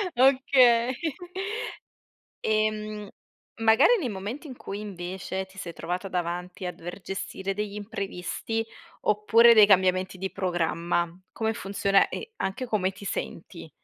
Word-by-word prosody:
Okay. 255 -2 +5 1.5
Ehm, 215 -1 0 0.5
magari 225 - +6
nei 270 -9 -2
momenti, 210 +9 -5
in 260 - -8
cui 200 -3 -6
invece 190 -1 -5
ti 190 0 -20
sei 175 -3 -6
trovata 180 +4 -4
davanti 180 +1 -3
a 180 - -1
dover 175 +4 -8
gestire 195 0 -4
degli 210 0 -3
imprevisti, 205 +2 -3 0.4
oppure 230 +3 +6
dei 215 -2 +9
cambiamenti 185 -1 +3
di 190 +1 -4
programma, 175 -2 0 0.2
come 220 0 -1
funziona 195 -1 +2
e 455 - -6
anche 195 - -2
come 205 -5 0
ti 195 +1 -12
senti? 170 -3 -5
200 Hz, 125 wpm, -27 LUFS, 185-220 Hz, 1.5 s, dei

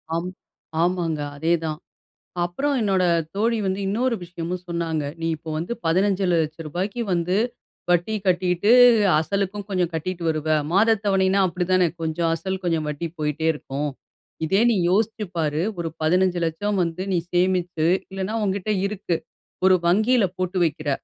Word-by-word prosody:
ஆம் 175 +2 -2 0.5
ஆமாங்க, 170 -3 0 0.2
அதேதான். 160 0 -1 0.7
அப்புறம் 275 +12 -1
என்னோட 195 -3 +2 0.3
தோழி 230 +3 +1
வந்து 190 +1 -1
இன்னொரு 235 +5 +1
விஷயமும் 175 +1 -5
சொன்னாங்க, 165 -3 -2 0.2
"நீ 165 - 0
இப்போ 160 +1 -9
வந்து 170 +9 -3
பதினஞ்சு 190 +3 +2
லட்ச 155 -2 0
ரூபாய்க்கு 190 +9 -3
வந்து 175 +1 0 0.5
வட்டி 175 +5 +2
கட்டீட்டு, 180 +3 +2 0.5
அசலுக்கும் 200 +4 -2
கொஞ்சம் 180 -3 0
கட்டிட்டு 170 +2 -3
வருவ." 155 0 -2 0.2
மாத 220 +5 +4
தவணைன்னா, 195 -1 +3
அப்படித்தானே 180 +1 +1
கொஞ்சம் 165 +1 0
அசல், 190 +3 -3
கொஞ்சம் 165 -3 0
வட்டி 150 +3 -3
போய்ட்டே 150 +1 -1
இருக்கும். 145 0 -4 0.6
இதே 195 +6 +2
"நீ - - +2 0.2
யோசிச்சு 220 +2 +1
பாரு. 155 -1 0 0.2
ஒரு 165 -1 -2
பதினைந்து 180 +3 +2
லட்சம் 200 +6 -1
வந்து 170 +1 -3
நீ - - +2 0.2
சேமிச்சு 180 -2 +1 0.2
இல்லனா 195 +3 -3
உன்கிட்ட 200 +1 -1
இருக்கு, 200 -3 -2 0.5
ஒரு 190 0 +7
வங்கியில 215 +5 +4
போட்டு 185 0 -2
வக்கிற 155 -2 -2
180 Hz, 140 wpm, -23 LUFS, 165-195 Hz, 0.7 s, ஒரு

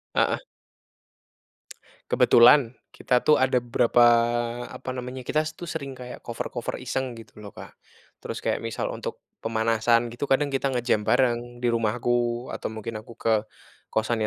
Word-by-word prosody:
Heeh. - - +2 1.7
Kebetulan 120 +1 +6 0.2
kita 125 -1 0
tuh 150 - +5
ada 130 -2 +2
beberapa, 120 0 +3 0.6
apa 130 - -7
namanya, 125 0 -6
kita 155 +4 -1
tus 170 -2 -5
sering 135 -1 -7
kayak 125 0 -9
cover-cover 120 +1 -5
iseng 130 -1 -3
gitu 115 -1 -13
loh, 105 -2 -11
Kak. - - -10 0.5
Terus - - -6
kayak - - 0
misal 115 0 -3
untuk - - -6 0.2
pemanasan 115 +1 +1
gitu 120 +4 -4
kadang 140 +1 +2
kita 135 0 0
nge-jam 120 -4 0
bareng 120 -1 +1
di 120 - +3
rumahku 120 +1 0
atau - - -4
mungkin 110 0 -6
aku 115 +2 -13
ke 115 - 0 0.6
kosan 110 +1 -1
120 Hz, 145 wpm, -25 LUFS, 115-130 Hz, 1.7 s, Kebetulan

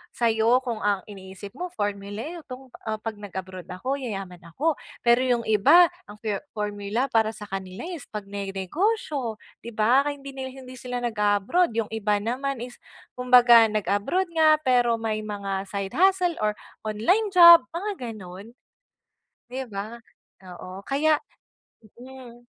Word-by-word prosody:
sa'yo, 230 +2 +2
kung 235 -4 -3
ang 200 -2 0
iniisip 190 0 -10
mo 360 - -2
formula, 205 +1 -3 0.2
etong, 265 -3 -11 0.2
ah, 215 - 0
'pag 220 -2 -5
nag-abroad 190 -2 -8
ako 255 +10 -3
yayaman 195 -8 -6
ako, 295 - -1 0.2
pero 235 0 +5
yung 240 -2 +1
iba 320 - +5 0.2
ang 205 - -11
for 210 -3 -1 0.2
formula 210 +4 -2
para 220 -1 +2
sa 210 - -9
kanila 190 -1 -6
is 330 -7 -8
pagnenegosyo, 210 - -2 0.2
'di 235 -1 -10
ba? 245 +7 +3
Kaya 290 - -2
hindi 275 0 -9
nila, 265 -1 -6
hindi 255 0 -11
sila 245 0 -5
nag-a-abroad, 215 - +1
yung 225 -2 -1
iba 210 -2 0
naman 255 +2 -2
is 245 0 -10 0.3
kumbaga 245 -2 +6
nag-abroad 215 - -1
nga 315 -2 +5
pero 245 -2 +3
may 225 -1 -2
mga 200 -2 -4
side 200 -1 -4
hustle, 370 -2 +3
or 210 0 0 0.3
online 355 - +1
job 340 -1 +11 0.2
mga, 410 +5 -2 0.2
gano'n. 195 +4 -11 1.0
'Di 260 - -3
ba? 215 +4 -6 0.5
Oo, 185 +1 -9
kaya 305 +5 +2 0.8
mm, 245 -2 -12
225 Hz, 145 wpm, -25 LUFS, 205-265 Hz, 1.0 s, job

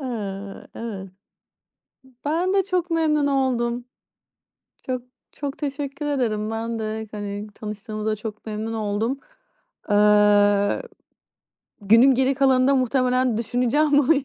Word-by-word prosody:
Eee, 200 -6 -5
evet. 200 -5 -6 1.2
Ben 345 +6 +1
de 390 - +3
çok 360 -2 -1
memnun 305 -3 +2
oldum. 245 -3 0 1.0
Çok, 255 -1 -2 0.3
çok 280 -1 -5
teşekkür 285 0 -4
ederim. 220 -7 -1
Ben 225 +1 -3
de, 220 0 -4
hani, 205 -1 -5
tanıştığımıza 215 0 -4
çok 215 0 -8
memnun 215 +1 -4
oldum. 220 +5 -1 0.7
Eee. 205 -1 +4 1.0
Günün 230 +6 +6
geri 265 +2 +2
kalanında 265 0 +4
muhtemelen 255 -1 +2
düşüneceğim 250 +6 +1
bunu 285 +2 +5
yani. 275 -2 -1
235 Hz, 110 wpm, -23 LUFS, 215-275 Hz, 1.2 s, Günün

